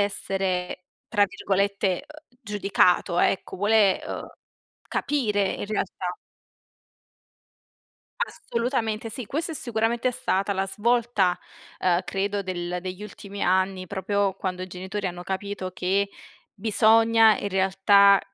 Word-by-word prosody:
essere 190 -3 -1 0.2
tra 205 -3 +4
virgolette 200 -1 -1
uhm 305 0 -14 0.2
giudicato, 195 -4 +2
ecco, 190 - 0
vuole 205 0 +3
uhm - - -5 0.6
capire 210 -9 0
in - - -5
realtà. 190 -3 -3 2.0
Assolutamente 230 -6 -2
sì, 240 0 -4
questa 325 - -2
è - - -5
sicuramente 235 -1 0
stata 205 -6 0
la 195 0 -1
svolta, 215 -3 +1 0.4
uhm 175 -1 +3
credo 200 +1 -2
del 180 -1 -3
degli 185 +2 -6
ultimi 200 -1 -8
anni, 185 0 +1
proprio 200 +1 -1
quando 185 -1 -4
i - - -5
genitori 190 +3 -5
hanno 175 -1 -5
capito 190 0 -4
che 195 +3 0 0.5
bisogna 225 +1 +5
in 200 - -3
realtà 195 +1 +5
200 Hz, 115 wpm, -25 LUFS, 190-220 Hz, 2.0 s, bisogna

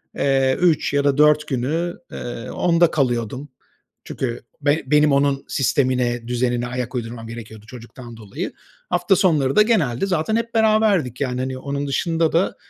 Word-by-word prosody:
eee, 135 -1 +2
3 165 -5 +2
ya 140 0 +2
da 140 -1 +2
4 150 0 +4
günü, 155 +7 -2 0.2
eee, 120 -1 -6
onda 170 -1 +2
kalıyordum. 125 0 -1 0.5
Çünkü 120 -3 -4 0.2
be 145 +2 +1
benim 150 +1 +4
onun 140 0 +1
sistemine, 125 -3 0
düzenine 120 0 -1
ayak 125 +1 -4
uydurmam 115 -1 -5
gerekiyordu 110 -2 -10
çocuktan 120 0 -11
dolayı. 105 -3 -6 0.4
Hafta 180 +2 +2
sonları 150 -8 +2
da - - +7
genelde 190 - +1
zaten 185 +2 0
hep 230 +1 -2
beraberdik, 215 - +2
yani, 125 -2 -1
hani, 130 0 -3
onun 140 +2 -4
dışında 165 +3 0
da, 170 +4 +1
140 Hz, 150 wpm, -21 LUFS, 120-165 Hz, 0.5 s, da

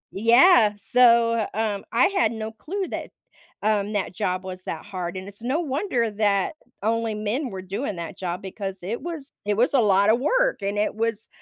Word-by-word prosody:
Yeah, 230 - +6
so, 230 +1 +4
um, 215 -3 -1
I 235 - +4
had 380 - +1
no 220 -1 -5
clue 370 - -4
that, - - -5 0.5
um, 210 0 +1
that 195 -2 -2
job 185 +1 -2
was 185 -1 -7
that 160 - -5
hard, 185 -3 -5
and 185 - -7
it's 200 +2 -12
no 260 +7 0
wonder 270 - -1
that 205 - +1 0.3
only 225 0 0
men 220 +6 -2
were 190 -2 -6
doing 200 +4 -4
that 170 +2 -6
job 180 +1 -4
because 195 0 -6
it 215 +6 -4
was 320 -5 -6
it 205 0 +1
was 245 +5 +2
a 265 - +5
lotta 200 0 +4
work, - - +1
and 200 +1 -2
it 210 - +1
was 225 -1 -2
215 Hz, 190 wpm, -24 LUFS, 200-245 Hz, 0.5 s, Yeah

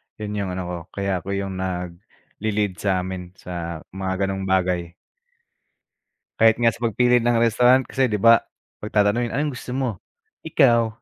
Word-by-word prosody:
Yun 105 -1 -4
yung 100 -2 -2
ano 95 - -3
ko, 90 - -3 0.2
kaya 100 -2 -1
ako 100 +4 -4
yung 95 -1 -4
nag-lelead 95 +2 -4
sa'min 95 -2 -2
sa 85 -3 -6
mga 95 0 -2
ganong 95 0 -3
bagay. 90 -2 0 1.5
Kahit 110 0 +6
nga 115 -1 +3
sa - - -13
pag-pili 125 +2 +3
ng 120 0 +1
restaurant 120 +3 +4
kasi 130 +1 0
di 110 - -1
ba 115 +2 +6 0.4
pag-tatanungin 105 +3 +1
anong 145 +1 0
gusto 125 - -6
mo? 130 -2 0 0.6
Ikaw? 120 -7 +4
100 Hz, 145 wpm, -22 LUFS, 95-115 Hz, 1.5 s, Kahit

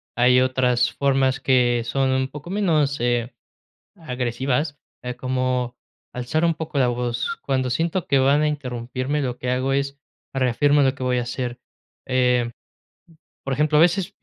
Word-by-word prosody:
hay 125 +1 +5
otras 125 -1 +2
formas 135 -1 +1
que 120 -3 +3
son 135 +2 0
un 130 0 0
poco 150 +4 -9
menos, 155 - +1
eh, 120 0 0 0.6
agresivas, 130 +1 -2 0.2
eh, 125 0 -5
como 130 -1 -1 0.4
alzar 125 +6 -1
un 165 -1 +3
poco 155 -2 -4
la 125 - +3
voz, 120 - -2
cuando 130 -2 0
siento 165 +7 -1
que 135 - +3
van 140 +3 +3
a 155 - +2
interrumpirme, 130 0 -3
lo 125 -3 -2
que 125 - -3
hago 130 +2 0
es, 140 0 -2 0.4
reafirmo 140 +3 +3
lo 135 -1 +2
que 135 - -9
voy 125 -1 +1
a - - 0
hacer, 120 0 -4 0.5
eh, 125 -2 +2 0.9
por 135 - -1
ejemplo, 150 +2 +2
a - - +6
veces 175 +2 +2
130 Hz, 160 wpm, -23 LUFS, 125-145 Hz, 0.9 s, a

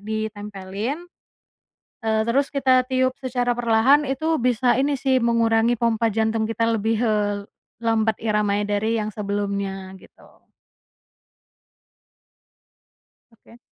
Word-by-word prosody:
ditempelin, 210 - -5 1.0
eee, 220 -1 0
terus 265 +5 +1
kita 260 -3 +2
tiup 260 0 +1
secara 245 -2 -1
perlahan 240 +5 +3
itu 315 +4 0
bisa 245 +1 +2
ini 280 +1 +1
sih, 260 0 +1
mengurangi 230 0 +2
pompa 230 -1 +1
jantung 220 0 0
kita 225 0 -2 0.2
lebih, 220 +2 0
eee, 205 -2 0 0.4
lambat 220 -1 +1
iramanya 205 -1 0
dari 220 +2 0
yang 215 - -4
sebelumnya, 200 -2 -3
gitu. - - -21 2.8
Oke. 230 +1 -20
225 Hz, 105 wpm, -23 LUFS, 210-250 Hz, 2.8 s, perlahan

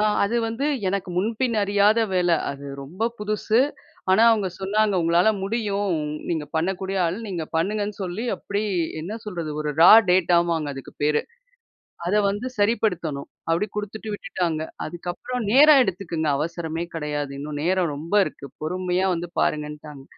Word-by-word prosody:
ஆ - - +3 0.2
அது 215 +4 0
வந்து 235 +6 -2 0.2
எனக்கு 195 0 -2
முன்பின் 225 +4 0
அறியாத 205 +2 +3
வேல. 180 -1 +2 0.2
அது 140 0 -8 0.2
ரொம்ப 175 +11 -4
புதுசு. 215 +2 +1 0.5
ஆனா 190 +4 +5
அவுங்க 210 -4 +2
சொன்னாங்க 205 +2 +1
"உங்களால 170 +4 +4 0.2
முடியும். 205 -2 -1 0.4
நீங்க 160 -3 -1
பண்ணக்கூடிய 190 +3 -1
ஆள். 165 +2 -2
நீங்க 175 -4 -3
பண்ணுங்கன்னு" 205 +4 -1
சொல்லி 185 +5 -4
அப்பிடி 200 +1 -3 0.4
என்ன 190 +8 -5
சொல்றது, 175 -7 -4
ஒரு 150 -1 -1
ரா 170 - +9 0.2
டேட்டா 180 -1 +4
வாங்க 160 -3 -1
அதுக்கு 135 - -9
பேரு. 150 0 +3 0.9
அத 180 - +1
வந்து 205 +5 -2
சரிப்படுத்தணும். 180 -9 0 0.2
அப்பிடி 165 +5 +1
குடுத்துட்டு 210 +1 -5
விட்டுட்டாங்க. 170 -5 -2 0.2
அதுக்கப்புறம் 175 +9 -5
"நேரம் 290 +2 +8
எடுத்துக்குங்க, 170 -6 -2
அவசரமே 165 +1 -3
கெடையாது. 150 -3 -3
இன்னும் 145 +1 -5
நேரம் 180 -2 +1
ரொம்ப 165 +7 -5
இருக்கு. 140 - -8
பொறுமையா 180 +3 0
வந்து 175 +1 -4
பாருங்க"ன்ட்டாங்க. 150 -2 -3
185 Hz, 145 wpm, -24 LUFS, 160-210 Hz, 0.9 s, ரா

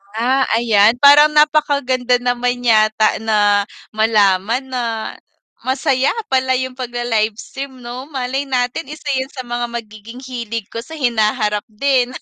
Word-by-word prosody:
Ah, 255 +4 +1
ayan 225 -1 +4
parang 290 +1 +8
napakaganda 285 -5 +2
naman 245 0 -1
yata 215 -1 +3
na 205 -2 +2 0.3
malaman 215 +2 +2
na 255 -2 -4 0.8
masaya 265 0 +1 0.2
pala 260 0 +2
yung 260 0 -2
pagla-livestream 240 +1 -3
'no, 245 +3 -7
malay 265 0 -2
natin 250 +2 -2
isa 305 -1 -10
'yan 260 - -2
sa 260 -3 -7
mga 240 0 -3
magiging 230 0 -8
hilig 230 -4 -5
ko 230 - -5
sa 320 +5 -10
hinaharap 215 -5 0
din. 250 +3 0
245 Hz, 130 wpm, -18 LUFS, 220-260 Hz, 0.8 s, parang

